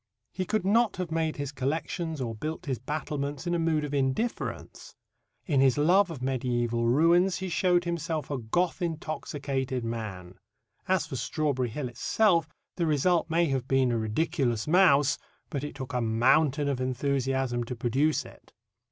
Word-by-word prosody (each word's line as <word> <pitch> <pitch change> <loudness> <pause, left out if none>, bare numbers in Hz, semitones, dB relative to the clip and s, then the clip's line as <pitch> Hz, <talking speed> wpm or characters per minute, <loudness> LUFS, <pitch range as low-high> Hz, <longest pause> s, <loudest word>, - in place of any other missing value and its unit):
He 185 0 -3
could 215 0 -1
not 220 +1 +3
have 180 -3 -4
made 160 -1 0
his 145 -2 -4
collections 155 +4 -3
or 120 -3 -3
built 155 +9 -5
his 130 -5 -2
battlements 145 +2 -4
in 175 - 0
a 170 - +1
mood 160 -2 +1
of 145 -1 -4
indifference. 140 - -2 0.5
In 140 -6 +2
his 135 -1 +4
love 180 +6 +4
of 155 -6 -7
mediæval 120 -3 0
ruins 170 +8 +4
he 190 0 -4
showed 175 +1 +2
himself 165 -4 -3
a 140 - -1
Goth 170 +13 -1
intoxicated 140 -5 -3
man. 95 -6 -6 0.5
As 185 -3 +2
for 145 -4 -5
Strawberry 130 -1 -1
Hill 130 +4 -4
itself, 165 - +2 0.3
the 170 -2 +1
result 165 +4 +2
may 170 +1 +3
have 135 -2 -1
been 135 -2 +2
a 120 - +1
ridiculous 120 +1 0
mouse, 150 -5 +4 0.3
but 140 -2 -3
it 145 - -6
took 130 -1 -7
a 125 - 0
mountain 130 +6 +3
of 135 -3 -1
enthusiasm 130 -1 0
to 125 - -5
produce 135 +5 +1
it. 115 - -16
145 Hz, 165 wpm, -28 LUFS, 130-165 Hz, 0.5 s, his